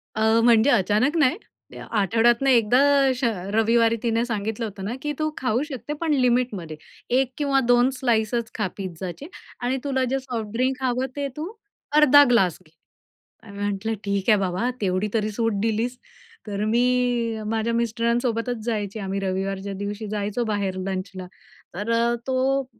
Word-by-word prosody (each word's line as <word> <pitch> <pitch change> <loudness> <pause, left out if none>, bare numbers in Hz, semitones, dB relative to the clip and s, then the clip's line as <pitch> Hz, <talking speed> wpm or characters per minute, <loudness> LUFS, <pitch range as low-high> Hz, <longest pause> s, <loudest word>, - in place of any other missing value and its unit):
अ, 220 +1 +3
म्हणजे 235 +2 +5
अचानक 215 - +2
नाही, 305 +3 +3 0.5
आठवड्यातन 230 +5 +2
एकदा 245 -1 +4 0.3
अशा 255 -2 +1 0.2
रविवारी 230 +1 +3
तिने 230 0 +1
सांगितलं 220 0 -3
होतं 195 -2 -7
ना 225 - -3
की 295 - -2
"तू 310 0 +1
खाऊ 250 0 0
शकते, 280 -1 -6
पण 320 -3 +1
लिमिटमध्ये 240 - 0 0.4
1 260 -1 0
किंवा 280 -2 +2
2 245 +1 +5
स्लाइसच 230 -1 0
खा 210 -3 0
पिझ्झाचे 185 - -6 0.3
आणि 250 +2 0
तुला 265 -2 0
जे 270 0 0
सॉफ्ट 240 -5 -5
ड्रिंक 260 +2 0
हवं 255 +1 0
ते 285 -1 -2
तू 330 +7 -4 0.4
अर्धा 290 -1 +8
ग्लास 190 -8 +3
घे." 155 - -24 0.7
आणि 200 -2 -12
म्हंटलं 205 +2 -2
"ठीक 200 +2 0
आहे 210 - +5
बाबा, 190 +6 -1
तेवढी 190 +1 0
तरी 215 -1 0
सूट 225 0 -1
दिलीस." 230 +3 -1 0.5
तर 205 0 -3
मी 240 -1 +1
माझ्या 225 +1 -1
मिस्टरांसोबतच 235 +1 0
जायची. 215 -2 -3
आम्ही 195 -1 -3
रविवारच्या 195 +1 -3
दिवशी 205 +2 -4
जायचो 210 +3 -2
बाहेर 200 -3 -2
लंचला. 185 -1 -5 0.5
तर 205 +5 -4
अ, 235 +1 +2
तो 265 +1 +1
230 Hz, 155 wpm, -24 LUFS, 205-250 Hz, 0.7 s, अर्धा